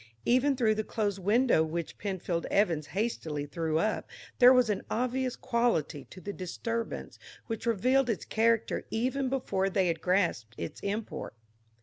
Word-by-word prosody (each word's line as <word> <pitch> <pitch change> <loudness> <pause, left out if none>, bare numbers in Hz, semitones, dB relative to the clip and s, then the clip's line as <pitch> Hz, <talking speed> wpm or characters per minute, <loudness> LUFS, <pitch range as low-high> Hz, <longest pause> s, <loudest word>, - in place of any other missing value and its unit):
Even 260 +3 +3
through 230 -4 +3
the 215 0 -2
closed 205 -3 -2
window 215 -1 +3
which 165 +1 -4
Penfield 185 -4 -2
Evans 165 -7 +1
hastily 165 -9 -2
threw 160 +1 -1
up, 215 +6 -1 0.3
there 250 -1 +9
was 250 -2 +5
an 200 - -2
obvious 255 +1 -1
quality 235 - 0
to 180 - -12
the 200 +2 -6
disturbance 230 +6 -4 0.3
which 225 0 -4
revealed 250 +4 +3
its 220 - -1
character 225 0 +1
even 255 +4 0
before 195 -7 0
they 190 -2 +2
had 165 -1 -2
grasped 170 - 0
its 85 - -5
import. 200 - -4
210 Hz, 150 wpm, -30 LUFS, 170-240 Hz, 0.3 s, there